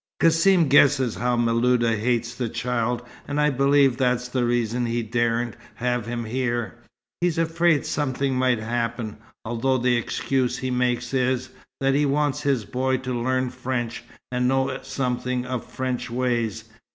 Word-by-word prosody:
Cassim 165 +1 +4
guesses 135 -3 +4
how 120 +1 0
Miluda 120 0 +2
hates 120 +1 0
the 120 -1 -3
child, 120 0 -1 0.2
and 145 +1 -2
I 150 0 +3
believe 140 -1 +3
that's 125 -1 +1
the 125 0 -1
reason 120 0 0
he 120 0 -1
daren't 120 +1 0 0.2
have 125 -2 -1
him 120 -1 -3
here. 120 -2 -2 0.5
He's 175 -2 +1
afraid 165 -1 +2
something 135 -1 -1
might 130 -1 +2
happen, 115 0 -3 0.3
although 120 +3 0
the 125 0 +2
excuse 130 +1 -1
he 130 0 -3
makes 125 0 0
is, 130 -1 0 0.3
that 135 0 +3
he 145 +1 +2
wants 145 0 0
his 135 -7 0
boy 130 +4 0
to 130 0 -4
learn 130 +1 0
French, 125 -2 -3 0.3
and 125 0 +1
know 135 +1 +1
something 125 -1 -2
of 125 -2 -3
French 130 -2 -3
ways. 120 -3 -1
125 Hz, 150 wpm, -24 LUFS, 120-130 Hz, 0.5 s, Cassim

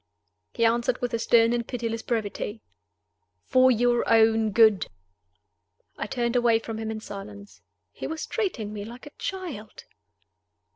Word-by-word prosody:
He 230 - +2
answered 235 +2 +1
with 245 -1 -3
a 230 - 0
stern 230 0 +4
and 235 -1 -2
pitiless 230 -2 -3
brevity, 220 -1 -3 0.8
"For 255 0 +5
your 240 0 +3
own 225 -1 +4
good." 215 -1 +4 1.1
I - - -4
turned 235 +1 -1
away 240 -2 +4
from 225 -1 -6
him 220 0 -4
in 220 0 -4
silence. 205 0 -10 0.3
He - - -6
was 320 0 -4
treating 240 - -3
me 205 -1 -5
like 235 +4 -10
a 290 - -10
child. 330 - -6
230 Hz, 145 wpm, -26 LUFS, 220-240 Hz, 1.1 s, For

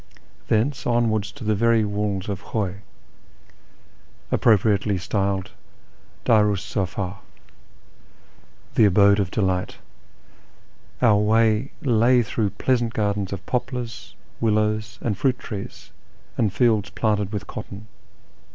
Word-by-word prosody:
Thence 120 +5 0
onwards 110 -4 +1
to - - -10
the 110 0 +1
very 115 +1 +3
walls 100 -2 -2
of 100 -2 -4
Khuy 100 -3 -3 1.5
(appropriately 105 -2 +3
styled 95 +1 -2 0.4
" - - -32
Bariis 105 -4 +2
mfd" 95 0 -2 0.8
" - - -31
the 110 - +5
Abode 100 +1 +5
of 95 -3 0
Delight 95 -2 -1 0.6
") - - -32
our 110 -4 +6
way 110 +3 +2
lay 120 -1 +4
through 105 0 -1
pleasant 120 +1 0
gardens 100 -2 -1
of 100 -1 -6
poplars, 125 -2 -4 0.2
willows, 110 0 0
and 110 -4 0
fruit 130 -2 +2
trees, 100 -5 -8 0.4
and 105 -4 +1
fields 110 -3 +2
planted 105 -3 -1
with 100 -2 -4
cotton. 100 0 -8
105 Hz, 115 wpm, -23 LUFS, 100-115 Hz, 1.5 s, our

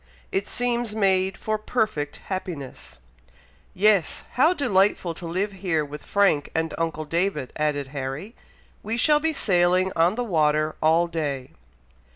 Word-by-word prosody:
It 195 +1 -1
seems 240 -3 -1
made 190 -2 +2
for 215 0 -2
perfect 215 - -2
happiness!" 175 -8 -6 0.8
"Yes! 200 -2 +2
how 290 +7 +4
delightful 200 - +2
to 170 +1 -7
live 190 +5 -1
here 180 -6 -1
with 145 +1 -8
Frank 195 -8 +2
and 160 0 -1
uncle 160 -2 -2
David!" 165 -3 -1
added 145 -3 -1
Harry. 140 - -5 0.5
"We 225 +2 -3
shall 295 +5 +4
be 320 +1 0
sailing 185 -5 +2
on 170 +4 +3
the 245 - -1
water 155 -6 +1
all 160 +2 +4
day!" 145 -6 -3
180 Hz, 140 wpm, -24 LUFS, 155-210 Hz, 0.8 s, how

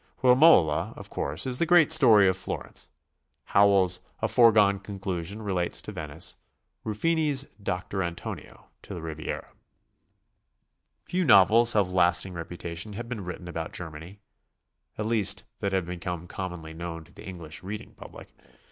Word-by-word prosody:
"Romola," 125 - +5
of - - -11
course, 75 +3 -3
is 125 -1 +1
the 170 - +2
great 175 -2 +5
story 120 -10 +7
for 95 - +3
Flor 95 - -5
ence. - - -6 0.5
Howells' 95 -3 +3 0.2
"A - - 0
Foregone 105 -4 +4
Conclusion" 95 0 -6
relates 90 -4 -1
to - - -6
Venice, 80 -4 -5 0.5
Ruffini's 145 +4 0 0.2
"Doctor 95 0 -3
Antonio" 85 -1 -7
to - - -9
the 85 - -7
Riviera. 80 -1 -6 1.5
Few 185 +1 -1
novels 115 - +6
of 100 -3 +3
lasting 90 0 +2
reputation 85 +3 -5
have 115 +3 -6
been 115 -5 -5
written 90 0 -7
about 85 -1 -5
Germany, 85 +4 -8 0.4
— - - -48
at 105 - -3
least 110 -4 +1 0.2
that 100 - -2
have 95 -2 0
become 90 -1 -5
commonly 90 -3 -7
known 85 0 -7
to 85 +3 -21
the - - -12
English 85 -4 -8
reading 100 +3 -7
public. - - -13
95 Hz, 145 wpm, -27 LUFS, 85-110 Hz, 1.5 s, story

